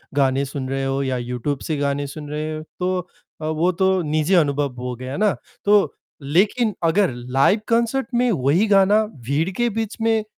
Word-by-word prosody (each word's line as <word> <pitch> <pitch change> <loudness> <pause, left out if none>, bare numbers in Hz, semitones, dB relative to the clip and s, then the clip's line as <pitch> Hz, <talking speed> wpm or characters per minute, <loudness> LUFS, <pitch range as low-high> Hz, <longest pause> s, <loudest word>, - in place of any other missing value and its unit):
गाने 135 -1 +2
सुन 135 -1 -5
रहे 135 0 -2
हो 135 +1 -1
या 130 -1 -1
यूट्यूब 125 +3 -3
से 155 - 0
गाने 140 0 -1
सुन 150 +1 -8
रहे 155 +1 -3
हो 155 - -5 0.2
तो 185 0 0 0.4
अ, - - -4
वो 160 +3 +1
तो 190 +1 +2
निजी 155 +2 0
अनुभव 145 -4 +2
हो 125 0 -4
गया 130 +3 -6
ना। 210 -1 +2 0.3
तो, 205 0 +4 0.3
लेकिन 205 - +2
अगर 175 +2 +3
लाइव 130 - +2
कॉन्सर्ट 235 +2 +1
में 245 0 +3
वही 165 - +2
गाना 205 +2 +5
भीड़ 145 - -2
के 240 - +3
बीच 225 -1 -4
में 225 -1 +2
155 Hz, 185 wpm, -21 LUFS, 135-205 Hz, 0.4 s, गाना